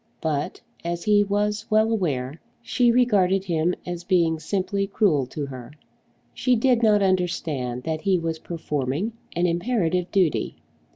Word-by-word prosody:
But, 150 Hz, -2 st, -2 dB, 0.2 s
as 170 Hz, 0 st, -3 dB
he 210 Hz, -1 st, +4 dB
was 210 Hz, +2 st, -1 dB
well 220 Hz, +1 st, +3 dB
aware, 145 Hz, -, -2 dB, 0.2 s
she 240 Hz, 0 st, +2 dB
regarded 195 Hz, -6 st, +3 dB
him 170 Hz, 0 st, 0 dB
as 175 Hz, -1 st, -5 dB
being 170 Hz, -3 st, +2 dB
simply 195 Hz, +3 st, -1 dB
cruel 170 Hz, -, +2 dB
to 145 Hz, +3 st, -4 dB
her. 130 Hz, -1 st, -9 dB, 0.6 s
She 250 Hz, -, +2 dB
did 240 Hz, 0 st, +2 dB
not 210 Hz, -3 st, +4 dB
understand 160 Hz, -9 st, -1 dB
that 160 Hz, -1 st, -3 dB
he 190 Hz, 0 st, +2 dB
was 165 Hz, -1 st, -3 dB
performing 155 Hz, -, -3 dB, 0.2 s
an 175 Hz, +1 st, +1 dB
imperative 180 Hz, -1 st, 0 dB
duty. 180 Hz, -6 st, +1 dB
180 Hz, 140 wpm, -24 LUFS, 160-205 Hz, 0.6 s, he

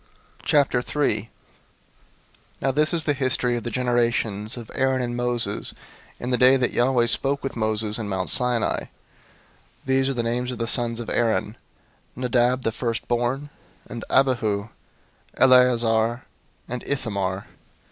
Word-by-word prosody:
003:001 140 Hz, -4 st, +1 dB, 1.3 s
Now 135 Hz, -, +1 dB
this 150 Hz, +3 st, +2 dB
is 170 Hz, -2 st, +2 dB
the 145 Hz, -, +1 dB
history 130 Hz, -2 st, 0 dB
of 120 Hz, -, -3 dB
the 120 Hz, -, -4 dB
generations 120 Hz, -3 st, 0 dB
of 115 Hz, -2 st, -9 dB
Aaron 130 Hz, 0 st, +1 dB
and 120 Hz, -1 st, -2 dB
Moses 120 Hz, -4 st, -1 dB, 0.4 s
in 125 Hz, -, -4 dB
the 125 Hz, -, +1 dB
day 130 Hz, +1 st, +6 dB
that 125 Hz, -2 st, 0 dB
Yahweh 120 Hz, -1 st, +2 dB
spoke 140 Hz, +4 st, 0 dB
with 135 Hz, -, -4 dB
Moses 110 Hz, -1 st, -1 dB
in 105 Hz, -2 st, -4 dB
Mount 95 Hz, -1 st, 0 dB
Sinai. 125 Hz, -3 st, +2 dB
003:002 -, -, -19 dB, 1.0 s
These 135 Hz, 0 st, +2 dB
are 135 Hz, -, -2 dB
the 120 Hz, -, -1 dB
names 125 Hz, +2 st, -1 dB
of 125 Hz, -, -6 dB
the 115 Hz, -, -2 dB
sons 115 Hz, 0 st, +1 dB
of 115 Hz, -, -7 dB
Aaron: 110 Hz, -2 st, 0 dB, 0.6 s
Nadab 125 Hz, 0 st, +1 dB
the 115 Hz, -, 0 dB
firstborn, 120 Hz, +4 st, -2 dB, 0.4 s
and 115 Hz, -1 st, -7 dB
Abihu, 115 Hz, -6 st, +1 dB, 0.7 s
Eleazar, 120 Hz, -2 st, +4 dB, 0.4 s
and 125 Hz, 0 st, -5 dB
Ithamar. 100 Hz, -8 st, -2 dB
120 Hz, 140 wpm, -23 LUFS, 115-130 Hz, 1.3 s, day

